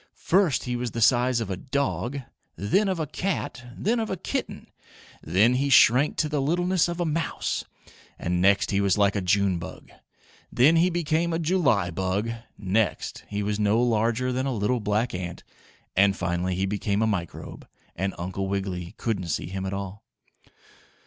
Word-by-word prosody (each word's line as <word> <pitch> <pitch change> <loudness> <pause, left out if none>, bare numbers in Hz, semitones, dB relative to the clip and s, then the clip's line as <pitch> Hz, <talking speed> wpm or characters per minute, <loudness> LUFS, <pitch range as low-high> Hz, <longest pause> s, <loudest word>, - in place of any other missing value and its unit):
First 185 -5 +2
he 125 -1 -2
was 120 0 -2
the 115 - -5
size 125 +1 +4
of 105 -4 -4
a - - -1
dog, 140 +3 -2 0.3
then 190 - +1
of 185 -3 -1
a 160 - 0
cat, 175 -6 -3
then 230 +4 +1
of 220 - -2
a 190 - -2
kitten, - - -4 0.6
then 100 +9 +3
he 140 +3 +1
shrank 130 +2 +5
to 155 - +1
the 150 -2 -1
littleness 175 +5 +2
of 175 0 -4
a 175 - +1
mouse, 160 0 -2 0.5
and 90 +1 -1
next 100 +1 +3
he 100 0 +2
was 100 -1 +2
like 100 0 +3
a 100 - 0
June 95 -1 +2
bug. 85 - -9 0.6
Then 145 +7 +5
he 175 +3 +4
became 170 0 0
a - - +1
July 150 - +2
bug, 95 +6 -1 0.3
next 100 -3 -1
he 105 0 -3
was 105 +1 -1
no 105 +2 +3
larger 120 +1 +1
than 130 +2 -1
a 135 - -1
little 110 +4 0
black 105 +3 0
ant, 90 -1 -5 0.5
and 100 0 +4
finally 90 0 -1
he 95 +2 0
became 100 +1 0
a - - +3
microbe, 90 -7 -4 0.3
and 95 +2 -2
Uncle 95 +2 -3
Wiggily 95 -3 -3
couldn't 100 -6 -2
see 80 - -2
him 95 0 -4
at 95 - -3
all. 100 +1 -6
110 Hz, 180 wpm, -26 LUFS, 95-140 Hz, 0.6 s, shrank